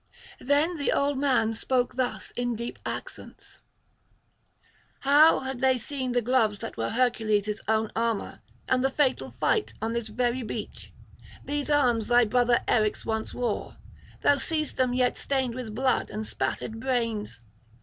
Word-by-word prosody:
Then 295 +6 +1
the 285 - 0
old 280 -1 +1
man 255 -5 +2
spoke 245 +2 0
thus 255 -1 -2
in 245 -1 -2
deep 235 +2 -6
accents: - - -8 1.4
'How, 295 +4 +6
had 265 -1 -4
they 260 0 +3
seen 260 0 -4
the 245 -1 +1
gloves 225 -4 +2
[411 - - -6
444]that - - -20
were 115 0 -1
Hercules' 215 -4 0
own 220 0 +1
armour, 230 -2 -2 0.3
and 255 0 +2
the 270 - +3
fatal 270 -1 0
fight 435 - +1
on 225 +1 -2
this 235 -1 -2
very 240 +3 -1
beach? 225 - -6 0.5
These 290 0 -2
arms 245 -7 +2
thy 240 0 +5
brother 240 +2 +3
Eryx 215 -2 +1
once 220 -1 -3
wore; 240 -4 -3 0.4
thou 285 - +4
seest 310 +1 -2
them 255 -1 +1
yet 250 -1 +1
stained 265 -3 -1
with 230 -4 -6
blood 260 +1 +1
and 215 +1 -4
spattered 210 +9 -3
brains. 230 - -2
245 Hz, 155 wpm, -27 LUFS, 225-265 Hz, 1.4 s, How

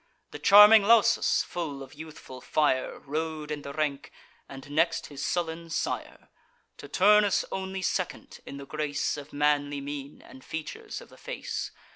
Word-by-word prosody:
The - - -8
charming 210 +2 +9
Lausus, 230 +2 +4
full 145 -6 -5
of 135 - -13
youthful 150 -4 -11
fire, 140 -3 0
Rode 155 +1 -4
in 150 -1 -4
the 140 - -7
rank, 140 -1 -3 0.4
and 135 +1 -10
next 165 +3 +1
his 140 - -6
sullen 165 -1 -2
sire; 165 - -4 0.5
To - - -10
Turnus 205 +1 +4
only 190 0 -4
second - - -3
in 140 - -7
the 140 - -8
grace 150 0 -2
Of 145 -1 -9
manly 145 -1 +1
mien, 140 0 -7
and 130 - -14
features 160 -1 -7
of - - -14
the - - -17
face. - - -5
155 Hz, 155 wpm, -27 LUFS, 145-175 Hz, 0.5 s, charming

